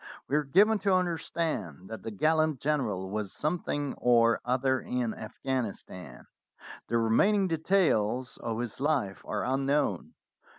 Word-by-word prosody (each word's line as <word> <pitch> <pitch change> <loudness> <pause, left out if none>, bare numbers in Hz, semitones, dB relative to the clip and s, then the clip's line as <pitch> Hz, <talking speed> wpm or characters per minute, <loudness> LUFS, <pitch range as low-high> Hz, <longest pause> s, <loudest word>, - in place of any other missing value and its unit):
We 140 - 0
are 150 - +2
given 205 +10 +4
to 195 -1 +2
understand 160 - -2
that 110 - -6
the - - -5
gallant 155 +5 +1
general 105 -11 -1
was 105 -2 -3
something 145 -2 -2
or 115 -2 +4
other 130 +1 +1
in 125 -3 -2
Afghanis 120 0 -4
tan. 80 -9 -11 0.6
The 115 - +1
remaining 190 - +3
details 155 - +1
of 115 -1 -4
his 120 -2 -4
life 135 -10 0
are 105 - -2
unknown. 135 - 0
130 Hz, 135 wpm, -29 LUFS, 110-155 Hz, 0.6 s, given